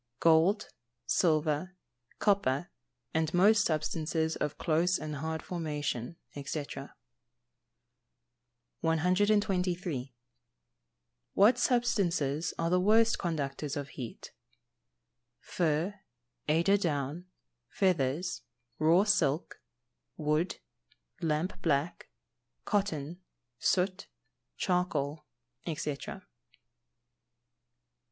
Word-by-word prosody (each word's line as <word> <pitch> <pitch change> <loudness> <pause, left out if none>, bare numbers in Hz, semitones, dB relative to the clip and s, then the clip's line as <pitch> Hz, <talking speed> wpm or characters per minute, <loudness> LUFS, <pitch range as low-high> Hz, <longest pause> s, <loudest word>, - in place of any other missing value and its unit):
_ - - -50
Gold, 165 +5 +4 0.4
silver, 155 +2 +1 0.4
copper, 175 -7 +1 0.4
and 160 -1 +1
most 205 +3 +5
substances 160 0 -1
of 150 0 -3
close 170 +3 +2
and 155 -1 -5
hard 160 +2 -3
formation, 150 -6 -3 0.2
&c. 145 +1 -4 2.1
123. 180 - +1 1.2
What 225 +5 +5
substances 175 - +1
are 165 0 0
the 180 - +4
worst 220 +4 +4
conductors 150 -3 -2
of 145 -1 -4
heat? 125 -4 -8 1.1
Fur, 165 +3 0 0.6
eider 170 +6 +4
down, 160 -1 -2 0.4
feathers, 175 -1 0 0.4
raw 165 +5 +5
silk, 170 -7 +1 0.6
wood, 155 +3 0 0.6
lamp 165 +3 -1
black, 155 0 0 0.6
cotton, 175 -5 -1 0.4
soot, 185 +4 +1 0.5
charcoal, 155 -5 -1 0.4
&c. - - 0 0.2
124. 185 +6 -8
165 Hz, 75 wpm, -31 LUFS, 150-185 Hz, 2.1 s, most